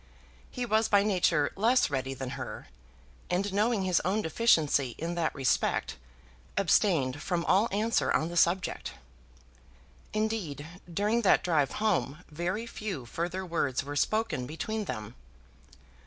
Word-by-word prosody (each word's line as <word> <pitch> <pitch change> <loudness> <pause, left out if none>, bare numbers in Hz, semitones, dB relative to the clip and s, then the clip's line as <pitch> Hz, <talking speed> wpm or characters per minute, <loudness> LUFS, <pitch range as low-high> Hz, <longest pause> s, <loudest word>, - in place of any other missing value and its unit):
He 250 -2 -4
was 220 0 +2
by 200 -1 +5
nature 175 -7 +2
less 235 - +3
ready 135 -1 -2
than 130 -1 -5
her, - - -7 0.6
and 190 +2 0
knowing 210 0 +2
his 185 -2 +2
own 205 +4 0
deficiency 155 - +2
in 170 +2 -3
that 170 -2 -1
respect, 135 - 0 0.6
abstained 160 -8 +2
from 170 -1 -1
all 200 +5 +4
answer 215 +3 +1
on 160 - +1
the 175 - -6
subject. 175 +2 +1 1.2
Indeed, 215 -10 -2 0.3
during 210 +6 +1
that 200 - +4
drive 155 -6 +1
home 180 -7 0
very 180 +8 -2
few 205 - -5
further 175 +8 -3
words 160 -7 -1
were 145 +1 -6
spoken 215 - 0
between 210 +8 -3
them. 110 - -5
180 Hz, 135 wpm, -29 LUFS, 145-210 Hz, 1.2 s, by